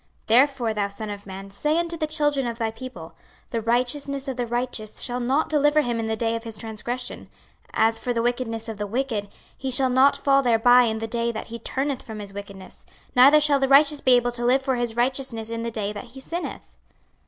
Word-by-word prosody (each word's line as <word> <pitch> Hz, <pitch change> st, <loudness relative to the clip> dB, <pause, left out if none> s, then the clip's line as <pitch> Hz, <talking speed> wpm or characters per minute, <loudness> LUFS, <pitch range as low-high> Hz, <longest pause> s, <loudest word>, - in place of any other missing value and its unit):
26:033:012 -, -, -39 dB
Therefore, 250 Hz, -1 st, +3 dB
thou 205 Hz, -1 st, 0 dB
son 200 Hz, +2 st, -6 dB
of 205 Hz, 0 st, -8 dB
man, 195 Hz, +1 st, -8 dB
say 300 Hz, +10 st, 0 dB
unto 340 Hz, 0 st, -1 dB
the 310 Hz, -2 st, -2 dB
children 295 Hz, -4 st, 0 dB
of 230 Hz, -1 st, -4 dB
thy 225 Hz, -2 st, -1 dB
people, 225 Hz, -9 st, -9 dB, 0.4 s
The 230 Hz, -, -1 dB
righteousness 260 Hz, +4 st, -1 dB
of 265 Hz, -, -3 dB
the 245 Hz, -1 st, -2 dB
righteous 240 Hz, -3 st, -3 dB
shall 245 Hz, -1 st, -2 dB
not 265 Hz, +5 st, +1 dB
deliver 300 Hz, 0 st, +3 dB
him 240 Hz, -4 st, -2 dB
in 225 Hz, -, -2 dB
the 220 Hz, -, -1 dB
day 225 Hz, +1 st, -1 dB
of 230 Hz, -, -5 dB
his 225 Hz, -2 st, -7 dB
transgression: 230 Hz, +4 st, -5 dB, 0.4 s
as 225 Hz, 0 st, +2 dB
for 250 Hz, -, -2 dB
the 230 Hz, -1 st, 0 dB
wickedness 240 Hz, -2 st, -2 dB
of 220 Hz, -2 st, -6 dB
the 205 Hz, 0 st, -3 dB
wicked, 225 Hz, -2 st, -2 dB, 0.3 s
he 265 Hz, -, -4 dB
shall 260 Hz, 0 st, +3 dB
not 270 Hz, +2 st, +5 dB
fall 275 Hz, 0 st, +3 dB
thereby 245 Hz, 0 st, +5 dB
in 220 Hz, -1 st, -1 dB
the 225 Hz, -, -3 dB
day 235 Hz, +1 st, -1 dB
that 220 Hz, -, -6 dB
he 235 Hz, -, -5 dB
turneth 270 Hz, +3 st, -2 dB
from 220 Hz, -2 st, -9 dB
his 200 Hz, -1 st, -8 dB
wickedness; 200 Hz, -2 st, -10 dB, 0.3 s
neither 275 Hz, +5 st, +8 dB
shall 290 Hz, -1 st, +3 dB
the 270 Hz, -, +2 dB
righteous 285 Hz, +2 st, +5 dB
be 255 Hz, -1 st, +5 dB
able 245 Hz, 0 st, +2 dB
to 240 Hz, 0 st, -3 dB
live 260 Hz, +3 st, +3 dB
for 265 Hz, -1 st, 0 dB
his 240 Hz, -2 st, -2 dB
righteousness 240 Hz, -2 st, -1 dB
in 230 Hz, 0 st, -3 dB
the 235 Hz, -, -2 dB
day 210 Hz, -2 st, -3 dB
that 210 Hz, +4 st, -7 dB
he -, -, -7 dB
sinneth. 335 Hz, +6 st, -7 dB
240 Hz, 230 wpm, -24 LUFS, 225-270 Hz, 0.4 s, neither